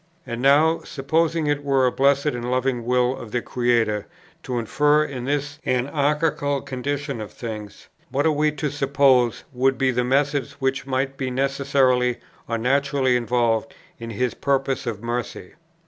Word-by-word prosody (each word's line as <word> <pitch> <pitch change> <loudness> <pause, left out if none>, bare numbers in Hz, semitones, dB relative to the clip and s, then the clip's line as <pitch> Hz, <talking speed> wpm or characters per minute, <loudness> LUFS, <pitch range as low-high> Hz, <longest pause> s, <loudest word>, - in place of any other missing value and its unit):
And 120 +1 -5
now, 150 +5 +4
supposing 155 +3 0
it 145 -1 0
were 135 -2 +2
the 125 - +3
blessed 140 +1 +3
and 120 -4 -2
loving 125 -1 0
will 125 +1 +2
of 120 - -9
the 125 - 0
Creator 120 -4 0 0.3
to 125 -5 -4
interfere 150 +6 +2
in 130 -5 -5
this 145 +1 -2
anarchical 145 +2 0
condition 140 -1 -3
of 105 - -7
things, 105 -4 -8 0.2
what 140 +3 0
are 160 - +4
we 150 0 +2
to 150 -1 -3
suppose 135 -4 +2
would 130 +1 +2
be 135 -1 +2
the 125 0 0
methods 140 +2 0
which 135 -1 -2
might 135 +1 -1
be 130 -1 -2
necessarily 130 -2 +1 0.3
or 115 - -1
naturally 135 +1 +1
involved 120 -2 0 0.2
in 115 0 -7
His 125 +2 -1
purpose 135 -1 -1
of 110 -2 -4
mercy? 120 -5 -4
135 Hz, 160 wpm, -23 LUFS, 125-140 Hz, 0.3 s, now